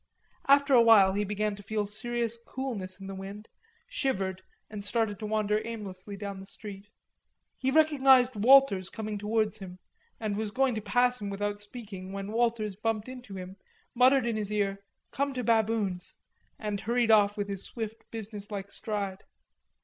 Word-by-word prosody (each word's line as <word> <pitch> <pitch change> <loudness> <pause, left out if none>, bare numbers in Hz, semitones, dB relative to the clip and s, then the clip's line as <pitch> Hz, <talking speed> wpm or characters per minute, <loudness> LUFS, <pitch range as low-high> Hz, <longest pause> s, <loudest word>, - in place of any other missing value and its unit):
After 280 0 +5
a 245 - +8
while 210 -5 +7
he 205 +1 0
began 210 +1 -1
to 205 - -11
feel 210 +1 -2
serious 235 +2 -1
coolness 210 -9 -4
in 195 - -9
the 195 - -6
wind, 195 +3 -8 0.4
shivered 195 - -2 0.3
and 210 -1 -7
started 210 -1 0
to 215 - -4
wander 215 0 +1
aimlessly 200 -3 -7
down 200 -1 -5
the 190 - -10
street. 200 -1 -9 0.7
He 265 - +1
recognised 265 -4 +5
Walters 215 -4 +5
coming 215 0 -5
towards 215 +1 0
him 185 -2 -9 0.4
and 215 -2 -2
was 215 0 -2
going 260 +3 +1
to 215 - -3
pass 245 +2 +2
him 200 - -3
without 205 +1 -3
speaking 205 -4 -8
when 200 +1 -5
Walters 225 -3 0
bumped 215 +1 -2
into 250 -6 -9
him, 185 +1 -8 0.4
muttered 255 +1 +5
in 230 -2 0
his 210 -1 -2
ear 200 -2 0 0.3
"Come 280 +1 -1
to 250 - -2
Baboon's," 220 -5 +1 0.4
and 210 -2 -3
hurried 235 0 +2
off 205 -1 +5
with 205 -1 -2
his 195 -1 -5
swift 225 -1 -6
business 210 -2 -7
like 200 -1 -5
stride. 200 -3 -4
210 Hz, 170 wpm, -29 LUFS, 200-235 Hz, 0.7 s, a